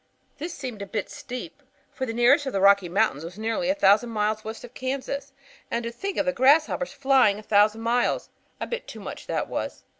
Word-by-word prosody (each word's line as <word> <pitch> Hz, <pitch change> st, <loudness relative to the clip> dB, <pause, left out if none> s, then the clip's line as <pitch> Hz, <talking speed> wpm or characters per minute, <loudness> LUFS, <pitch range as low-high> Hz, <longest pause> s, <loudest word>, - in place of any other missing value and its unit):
"This 330 Hz, +3 st, -5 dB
seemed 250 Hz, -7 st, -6 dB
a 200 Hz, -, -5 dB
bit 210 Hz, -1 st, -4 dB
steep, 250 Hz, +5 st, -8 dB, 0.3 s
for 260 Hz, -, -4 dB
the 225 Hz, -, -3 dB
nearest 255 Hz, +5 st, +4 dB
of -, -, -3 dB
the 195 Hz, -, +1 dB
Rocky 200 Hz, -2 st, +5 dB
Mountains 180 Hz, -5 st, +1 dB
are 180 Hz, +5 st, -9 dB
nearly 230 Hz, +5 st, -1 dB
a 285 Hz, -, +2 dB
thousand 225 Hz, -3 st, +4 dB
miles 215 Hz, -1 st, -1 dB
west 220 Hz, +1 st, -7 dB
of 245 Hz, -, -11 dB
Kansas. 275 Hz, +1 st, -4 dB, 0.4 s
And 235 Hz, 0 st, -2 dB
to 235 Hz, -, -4 dB
think 390 Hz, +11 st, -5 dB
of -, -, +1 dB
grasshoppers 270 Hz, 0 st, +3 dB
flying 265 Hz, -6 st, +3 dB
a 215 Hz, -, -10 dB
thousand 210 Hz, +1 st, +3 dB
miles! 245 Hz, -, 0 dB, 0.3 s
A -, -, -2 dB
bit 480 Hz, -, -5 dB
too -, -, -9 dB
much, -, -, -8 dB
that -, -, -1 dB
was. -, -, -4 dB
235 Hz, 210 wpm, -25 LUFS, 210-275 Hz, 0.4 s, Rocky